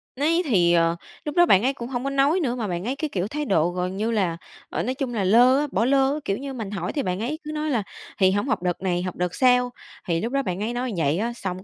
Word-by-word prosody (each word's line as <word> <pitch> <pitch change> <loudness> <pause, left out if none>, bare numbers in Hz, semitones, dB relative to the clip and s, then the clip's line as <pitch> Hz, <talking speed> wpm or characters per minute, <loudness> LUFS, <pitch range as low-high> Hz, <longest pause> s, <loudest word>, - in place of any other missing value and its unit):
Ni 320 +6 +2
thì, 180 - +3
ờ, 165 0 +3 0.3
lúc 295 - -4
đó 350 -1 +6
bạn 195 - +5
ấy 265 +2 +2
cũng 235 -2 -7
hông 250 -2 -3
có 275 - -1
nói 275 +5 +2
nữa, 255 -8 -1
mà 230 -4 -3
bạn 175 -1 -3
ấy 255 +3 -1
cái, 300 +2 -3
kiểu, 190 -6 -2
thái 295 +6 -3
độ 170 - +2
gần 180 +1 -3
như 220 +3 0
là, 185 -7 0 0.3
ờ, - - -2
nói 255 - -1
chung 260 -2 -3
là 210 -4 -1
lơ 240 +7 +5
á, 295 - 0
bỏ 220 +5 +1
lơ, 275 +2 +2
kiểu 195 - 0
như, 275 0 -6
mình 220 -6 -5
hỏi 180 -3 -3
thì 285 - -1
bạn 185 0 -2
ấy 275 +8 -3
cứ 305 - -6
nói 305 0 -2
là 235 -7 0 0.4
"Thì 190 -1 +5
hổng 205 +1 0
học - - 0
đợt 180 -1 -1
này, 180 -2 0
học 185 -1 -4
đợt 180 0 -2
sau." 250 -1 +3 0.4
Thì 165 -1 0
lúc 235 +5 -3
đó 275 0 +1
bạn 185 -2 -3
ấy 230 +2 -2
nói 245 0 -2
vậy 155 -1 +1
á. 230 +4 -1
Xong 185 -5 -5
230 Hz, 295 wpm, -24 LUFS, 185-275 Hz, 0.4 s, đó